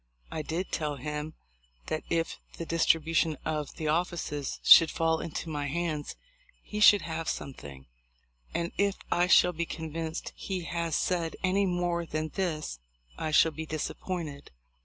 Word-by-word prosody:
I 160 - -2
did 165 +5 -3
tell 150 -2 -1
him 150 +3 -5 0.5
that 155 - -2
if 165 -1 -1 0.2
the 170 - -4
distribution 165 -1 +2
of 150 -2 -2
the 155 - -3
offices 155 -3 -1
should 165 - +9
fall 165 0 +1
into 165 +1 -5
my 145 -2 -2
hands 155 -1 -2 0.5
he 210 - -5
should 210 -1 +7
have 165 0 -3
something; 70 - -6 0.7
and 170 0 -2
if 200 0 +3 0.2
I 175 +1 +3
shall 180 -1 +6
be 170 0 -2
convinced 160 0 -5
he 185 -3 -4
has 170 -2 -2
said 170 -3 0
any 195 +1 +2
more 175 -1 0
than 155 0 -2
this 155 - -3 0.4
I 155 - -1
shall 160 +1 +5
be 160 +1 -6
disappointed. 155 -1 -4
165 Hz, 150 wpm, -29 LUFS, 155-175 Hz, 0.7 s, should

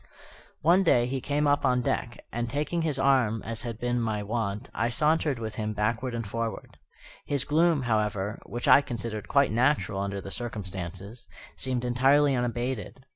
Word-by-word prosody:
One 175 +5 +5
day 125 -10 +4
he 130 +1 -3
came 145 +2 0
up 145 0 +2
on 125 0 +3
deck, 120 0 -2
and, 120 0 -2
taking 150 +6 -1
his 155 -4 -1
arm 130 -5 +2
as 115 0 -5
had 115 -3 -5
been 120 0 0
my 110 -2 -1
wont, 105 -1 -3
I 115 +2 0
sauntered 150 +1 +2
with 110 -2 -5
him 105 0 -2
backward 115 +4 -1
and 115 -1 -3
forward. 115 +2 -5 0.5
His 140 -3 0
gloom, 160 -1 +3
however 105 -3 -1
(which 120 +1 -4
I - - +8
considered 115 -5 -5
quite 140 -4 +3
natural 120 -3 +1
under 100 0 -2
the 100 0 -8
circumstances), 100 -1 -6 0.3
seemed 125 -2 -2
entirely 135 +3 +4
unabated. 120 +1 -3
120 Hz, 170 wpm, -27 LUFS, 110-135 Hz, 0.5 s, I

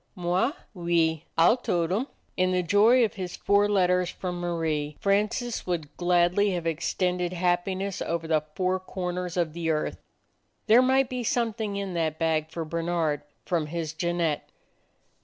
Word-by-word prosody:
"Moi? 185 - +1 0.2
Oui. 170 -3 +1
Ah 165 +1 +6
'll 240 - +2
tote 170 -8 -1
'em!" 225 +8 0 0.3
In 185 0 +2
the 180 0 +1
joy 220 +8 +5
of 215 - -4
his 185 -3 -5
four 205 +1 +2
letters 180 -3 +2
from 180 -2 -5
Marie, 160 -4 -2
Francis 210 +4 0
would 160 -5 -3
gladly 180 +3 +2
have 175 -2 -3
extended 180 +2 -1
happiness 185 +2 -1
over 165 -1 -2
the 155 -1 +2
four 185 0 +1
corners 180 -1 -4
of 165 -3 0
the 170 -1 -2
earth. 155 -1 -1 0.7
There 230 +3 +6
might 265 +1 +3
be 250 -1 -4
something 225 -3 -1
in 200 -2 -3
that 160 -2 -1
bag 160 -1 0
for 160 0 -4
Bernard 165 -2 -1 0.2
from 165 -4 0
his 160 0 -4
Jeannette. 170 -2 -1
175 Hz, 155 wpm, -27 LUFS, 165-200 Hz, 0.7 s, Ah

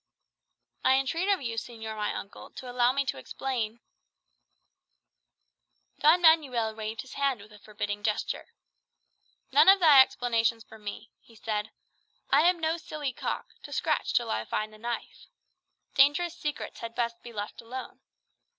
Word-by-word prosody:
"I 260 - +5
entreat 330 +8 0
of 390 -7 +2
you, 230 -2 -3
señor 220 -1 -5
my 210 -1 -1
uncle, 200 - -8
to 255 - -8
allow 245 0 +3
me 275 +1 0
to 135 - -3
explain 235 - -4 0.7
" - - -45
Don 330 +4 +5
Manuel 265 -9 +4
waved 220 0 -5
his 265 - -12
hand 275 -4 0
with 210 +1 -14
a 210 - -14
forbidding 205 -1 -4
gesture. 210 0 -2 1.0
"None - - +7
of 390 0 +8
thy 300 -6 +9
explanations 230 -3 +1
for 220 0 -15
me," 210 +2 -8
he 230 - -21
said. 215 -1 -3 0.6
"I 290 - +6
am 360 -1 0
no 320 +1 0
silly 300 -4 -5
cock, - - -4
to - - -11
scratch - - 0
till 240 -1 +2
I 110 +1 -1
find 215 - -3
the 215 - -15
knife. 235 +1 -5 0.7
Dangerous 295 +5 +4
secrets 300 -1 -5
had 230 0 -7
best 235 -1 -2
be 240 - -10
let 210 0 -6
alone. 250 +3 -8
240 Hz, 160 wpm, -28 LUFS, 220-280 Hz, 1.0 s, thy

